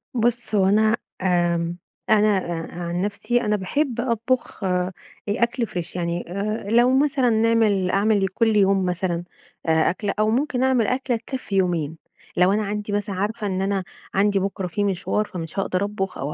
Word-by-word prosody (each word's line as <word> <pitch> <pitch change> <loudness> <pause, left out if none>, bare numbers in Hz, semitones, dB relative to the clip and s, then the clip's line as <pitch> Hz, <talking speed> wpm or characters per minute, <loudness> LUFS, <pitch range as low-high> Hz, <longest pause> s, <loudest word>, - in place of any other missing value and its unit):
بُصّ، 240 -1 0
هو 195 - +4
أنا 215 +3 +4 0.2
آمم 175 -2 +1 0.3
أنا 210 -2 +4
آآ، 170 -3 -4
عن 175 +1 -2
نَفسي 210 +4 0
أنا 210 -2 +1
باحب 240 +5 -1
أطبخ 235 0 -1
آآ، 180 -1 0 0.4
أكْل 235 +2 0
Fresh 175 -1 -5
يعني، 170 -1 -2
آآ، 205 +2 -3
لو 245 +3 +4
مثلًا 275 -4 +2
نعمل 220 -4 +3
أعمل 200 0 +2
لكُلّ 220 +3 +1
يوم 195 -1 +3
مثلًا 175 -1 -1 0.4
آآ 160 -1 +3
أكلَة، 200 +3 -2
أو 215 - +3
ممكن 255 +2 +1
أعمل 255 -5 +3
أكلَة 255 +1 0
تكفي 250 -3 -5
يومين، 170 -5 0 0.4
لو 180 +2 +5
أنا 215 +1 +1
عندي 205 0 -3
مثلًا 205 -1 -1
عارفة 210 +3 -2
إن 190 -1 -1
أنا 195 0 0 0.3
عندي 200 0 +3
بكرة 195 -1 -2
في 205 +4 -2
مشوار 200 +2 0
فمش 175 0 -6
هاقدر 190 +1 0
أطبخ 195 -2 -3
أو 145 +2 -3
200 Hz, 170 wpm, -23 LUFS, 185-225 Hz, 0.4 s, لو